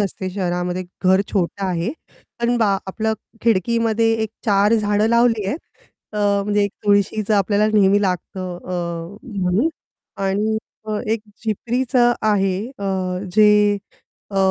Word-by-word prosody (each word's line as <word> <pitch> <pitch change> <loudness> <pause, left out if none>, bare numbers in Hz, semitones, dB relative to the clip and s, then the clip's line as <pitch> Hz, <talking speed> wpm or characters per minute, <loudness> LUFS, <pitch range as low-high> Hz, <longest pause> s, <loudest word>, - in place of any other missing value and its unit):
असते 190 -1 -2
शहरामध्ये 180 -1 -2 0.2
घर 190 +1 +5
छोटं 195 0 -1
आहे. 180 +4 -1 0.5
अण 240 +1 +2
बा 205 -4 +3
आपल 220 +3 -1 0.3
खिडकीमध्ये 225 +1 +2
एक 220 - -1 0.2
4 205 +1 +4
झाडं 210 -1 +2
लावली 235 -2 +3
आहेत. 210 - -2 0.5
अ, 210 - -3 0.3
म्हणजे 205 0 +1
एक 200 - -2
तुळशीचं 205 +1 +2
आपल्याला 205 +1 +2
नेहमी 205 -1 +4
लागतं 185 -1 -3
अ, 175 +1 -5
म्हणून 205 - 0 0.5
आणि 205 +3 +1 0.6
एक 225 - -1 0.2
झिपरीचं 240 +3 +1
आहे 195 -3 +2 0.2
अ, - - -8 0.5
जे 215 0 +7 0.8
अ, 200 - -5
205 Hz, 125 wpm, -20 LUFS, 190-220 Hz, 0.8 s, जे